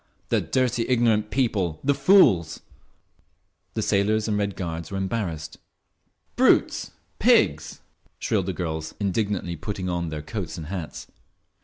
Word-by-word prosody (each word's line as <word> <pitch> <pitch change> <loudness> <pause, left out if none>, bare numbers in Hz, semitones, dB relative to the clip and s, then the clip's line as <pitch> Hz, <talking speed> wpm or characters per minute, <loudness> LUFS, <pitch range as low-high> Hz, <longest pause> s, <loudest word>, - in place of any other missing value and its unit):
The - - +2
dirty, 125 -2 0
ignorant 115 -4 +2
people! 100 - 0
The 140 - +3
fools!"… 100 - +4 1.1
The - - 0
sailors 105 +2 +1
and 105 - 0
Red 100 -2 -1
Guards 85 -3 -5
were 95 - -4
embarrassed. 90 -6 -3 0.8
"Brutes! - - +3 0.3
Pigs!" - - +3 0.4
shrilled 100 -4 -1
the - - 0
girls, 80 -2 -4
indignantly 100 -3 -1
putting 95 +3 -4
on 85 -1 -2
their 75 -1 -5
coats 95 +1 -5
and 80 - -6
hats. 90 -5 -6
95 Hz, 130 wpm, -25 LUFS, 85-110 Hz, 1.1 s, fools